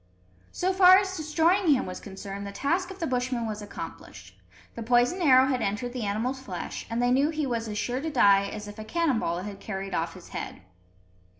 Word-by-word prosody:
So 370 +1 0
far 370 0 +8
as 380 -1 -1
destroying 325 +1 +3
him 255 - -1
was 185 0 -6
concerned, 200 0 -7
the - - -6
task 340 - -1
of 380 - -9
the 340 - -2
Bushmen 250 -3 -1
was 215 -1 -4
accomplished. 95 - -9 0.4
The - - -7
poisoned 245 +9 +2
arrow 260 -5 +6
had 260 -2 0
entered 220 +4 -2
the 245 -4 -3
animal's 235 +6 -2
flesh, 190 -9 -6
and 230 - -2
they 245 0 +2
knew 275 +4 +3
he 310 -2 -2
was 230 -3 -2
as 210 -1 -4
sure 250 +4 -2
to 320 - -3
die 200 -8 +4
as 210 0 -7
if 205 +1 -10
a - - -5
cannon 300 0 0
ball 175 -4 -2
had 200 -1 -7
carried 195 -2 -5
off 165 +2 -2
his 185 - -13
head. - - -7
245 Hz, 215 wpm, -27 LUFS, 200-300 Hz, 0.4 s, far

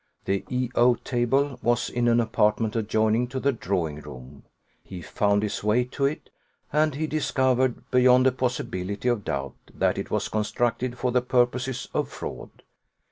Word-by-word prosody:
The 100 0 0
E 125 -1 -1
O 120 +1 +4
table 130 +3 0
was 120 0 +1
in 120 0 0
an 120 0 +4
apartment 110 -1 +1
adjoining 110 +2 +1
to 130 +2 -4
the 140 +2 +2
drawing 90 - -2
room: 70 -1 -11 0.4
he 95 - -9
found 100 +4 0
his 105 - -3
way 105 +4 +3
to 125 +3 -2
it; 145 +3 -3 0.4
and 155 -1 +2
he 155 +2 -1
discovered, 130 -4 0
beyond 125 0 +5
a 130 - +5
possibility 120 -5 -3
of 120 -4 0
doubt, 70 -5 -3 0.2
that - - 0
it - - -5
was - - -1
constructed 120 +3 -1
for 125 +1 -1
the 125 0 +2
purposes 125 0 0
of - - -1
fraud. - - -7
120 Hz, 165 wpm, -25 LUFS, 105-130 Hz, 0.4 s, beyond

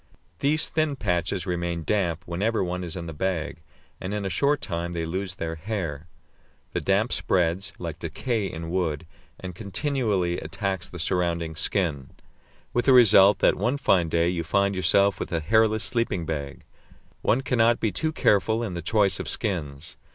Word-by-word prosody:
These 150 +3 +3
thin 155 -2 0
patches 90 -3 -1
remain 85 -2 -2
damp 90 -3 0
whenever 100 +6 0
one 90 0 -3
is 85 -3 -5
in 85 -2 -5
the 80 - -6
bag, 85 0 -3 0.4
and 95 +3 -4
in 105 -1 -3
a 95 - -2
short 140 - +2
time 85 -2 -4
they 85 -1 -2
lose 95 +3 -4
their 80 -3 -4
hair. 85 -4 -4 0.7
The - - -1
damp 100 +5 +1
spreads, 90 +2 +1
like 85 -2 -6
decay 100 - -2
in 80 +1 -6
wood, 85 -4 -1 0.3
and 95 -1 -7
continually 100 - -1
attacks 90 +3 -3
the 90 - -9
surrounding 85 -1 -1
skin, 75 -5 -1 0.6
with 120 - +1
the 135 - +6
result 105 -5 +7
that - - +5
one 120 +8 -1
fine 90 - +2
day 85 +1 +2
you 85 -1 -1
find 100 +5 +1
yourself 100 +2 +2
with - - -5
a 85 - 0
hairless 110 +5 +2
sleeping 115 -8 -1
bag. 70 -3 -5 0.6
One 125 - +2
cannot 120 -2 +2
be 110 - 0
too 155 - -1
careful 110 -4 +2
in 105 -6 -4
the 85 - -4
choice 100 +3 +1
of - - -2
skins. 80 -6 -3
90 Hz, 175 wpm, -25 LUFS, 85-105 Hz, 0.7 s, result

